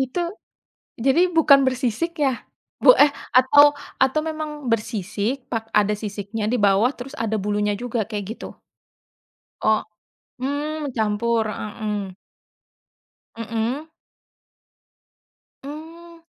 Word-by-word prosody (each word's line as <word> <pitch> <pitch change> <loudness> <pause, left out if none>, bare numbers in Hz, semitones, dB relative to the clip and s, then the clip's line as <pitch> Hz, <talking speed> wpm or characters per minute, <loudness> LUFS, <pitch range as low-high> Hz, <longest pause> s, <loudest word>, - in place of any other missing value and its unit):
Itu 265 +7 -1 0.8
jadi, 270 +8 +3
bukan 285 -4 +6
bersisik 260 +6 -1
ya? 270 -4 0 0.4
Bu - - +9
eh, 290 0 +6 0.2
atau 290 +3 +7 0.2
atau 265 +4 +3
memang 305 -3 -5
bersisik, 220 +3 -2
pak 225 -1 -2
ada 210 0 +3
sisiknya 210 +1 -5
di - - +2
bawah, 205 +5 +4
terus 265 +4 -9
ada 220 -5 -2
bulunya 205 +1 0
juga, 235 0 -2
kayak, 205 -2 -3
gitu? - - -8 1.2
O - - +1 0.7
hmm, 290 +1 -3
campur. 220 +1 +1
Heeh 210 0 -5
heeh. 205 -3 -3 1.3
Mhm. 230 +7 -3 1.8
Mmm. 330 +4 -10
245 Hz, 105 wpm, -22 LUFS, 215-290 Hz, 1.8 s, Bu